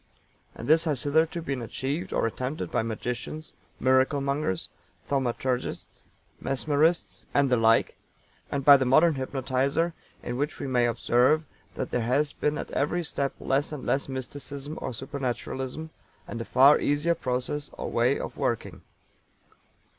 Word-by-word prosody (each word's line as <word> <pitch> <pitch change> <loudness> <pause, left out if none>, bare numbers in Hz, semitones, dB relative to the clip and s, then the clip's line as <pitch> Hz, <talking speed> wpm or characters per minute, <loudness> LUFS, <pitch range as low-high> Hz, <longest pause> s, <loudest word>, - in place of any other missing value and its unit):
And - - -7
this 160 +3 +5
has 145 -6 0
hitherto 160 +3 +1
been 135 -4 -3
achieved 135 +7 -3
or - - +1
attempted 130 +6 -3
by - - +1
magicians, 125 +7 -4 0.3
"miracle 130 +2 +3
mongers," 140 -8 -1 0.3
thaumaturgists, 130 -1 -2 0.4
mesmerists, 150 +5 +1
and 140 -2 +3
the - - +6
like, 115 0 +3 0.5
and 140 -1 -2
by 145 -1 +10
the 130 - 0
modern 155 +6 +5
hypnotizer, 135 +4 0 0.3
in 120 0 -3
which 145 +3 -2
we - - -5
may 125 -2 +2
observe 125 +6 +3 0.3
that 130 - -4
there 125 - 0
has 140 +6 +1
been 150 0 -1
at - - -5
every 175 +5 0
step 140 -3 -2
less 140 +3 0
and 145 -4 -6
less 140 0 0
mysticism 140 +3 -6
or - - -3
supernaturalism, 135 +3 -4 0.4
and 115 - -5
a - - -5
far 135 +4 +6
easier 145 +4 +2
process 130 +1 -2
or - - -5
way - - +2
of - - -5
working. - - -2
135 Hz, 145 wpm, -27 LUFS, 125-150 Hz, 0.5 s, by